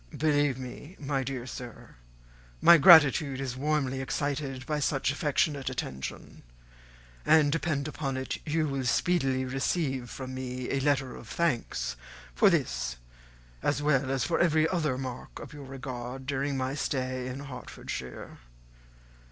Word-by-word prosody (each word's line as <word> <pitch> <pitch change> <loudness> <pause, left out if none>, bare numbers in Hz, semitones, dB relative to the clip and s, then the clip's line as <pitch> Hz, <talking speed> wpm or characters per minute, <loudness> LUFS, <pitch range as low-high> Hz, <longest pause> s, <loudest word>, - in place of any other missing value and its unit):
"Believe 145 -3 +2
me, 130 +6 -8
my 140 -1 -1
dear 130 -2 -4
sir, 125 -2 -9 0.7
my 170 - +8
gratitude 145 -5 +7
is 130 -2 -3
warmly 135 -1 0
excited 135 -1 -2
by 150 -1 -1
such 140 -1 +1
affectionate 145 -1 0
attention; 65 0 -6 0.8
and, 150 - +5
depend 155 -2 -1
upon 140 -3 -3
it, 130 0 -3
you 155 0 0
will 135 -2 -2
speedily 130 0 +1
receive 135 -1 -1
from 130 -1 -6
me 130 -1 -4
a 135 - +1
letter 135 -2 +1
of 115 - -11
thanks 115 - -1 0.4
for - - +5
this - - 0 0.7
as 145 0 0
well 140 -3 +2
as 135 -2 0
for 165 +8 0
every 160 -2 +4
other 155 -7 0
mark 130 -2 -6
of - - -9
your 145 -2 -9
regard 130 -1 -6
during 140 0 -1
my 130 0 -1
stay 130 -3 -2
in 130 +2 -5
Hertfordshire. 125 - -7
135 Hz, 140 wpm, -29 LUFS, 130-145 Hz, 0.8 s, my